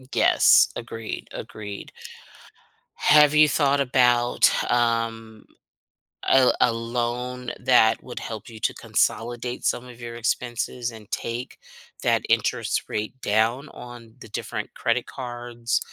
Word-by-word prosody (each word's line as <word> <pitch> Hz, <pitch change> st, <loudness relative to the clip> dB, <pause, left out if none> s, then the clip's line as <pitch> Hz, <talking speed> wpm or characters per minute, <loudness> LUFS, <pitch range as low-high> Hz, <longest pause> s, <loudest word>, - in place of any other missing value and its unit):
M 130 Hz, -, -17 dB
yes, -, -, +5 dB
agreed, 115 Hz, -1 st, -6 dB
agreed. 105 Hz, -2 st, -8 dB, 1.1 s
Have 150 Hz, 0 st, +5 dB
you 150 Hz, 0 st, +6 dB
thought 140 Hz, -1 st, +2 dB
about, 125 Hz, -2 st, +3 dB, 0.2 s
um, 115 Hz, -2 st, -1 dB, 0.8 s
a -, -, +5 dB
l 130 Hz, -, +4 dB
a 120 Hz, -, +4 dB
loan 120 Hz, +2 st, -3 dB
that 115 Hz, -3 st, +4 dB
would 125 Hz, -, -7 dB
help 110 Hz, -1 st, -7 dB
you 110 Hz, -1 st, -11 dB
to -, -, 0 dB
consolidate 120 Hz, +2 st, -1 dB
some 120 Hz, -, 0 dB
of 120 Hz, -1 st, -13 dB
your 120 Hz, 0 st, -7 dB
expenses 120 Hz, +1 st, -2 dB
and 110 Hz, -3 st, -13 dB
take 120 Hz, +2 st, -4 dB, 0.5 s
that -, -, +2 dB
interest -, -, +1 dB
rate 110 Hz, +5 st, -4 dB
down 115 Hz, +7 st, +1 dB
on 120 Hz, -2 st, -12 dB
the -, -, -11 dB
different -, -, -5 dB
credit 120 Hz, +1 st, 0 dB
cards 120 Hz, -2 st, -3 dB
120 Hz, 130 wpm, -24 LUFS, 115-125 Hz, 1.1 s, you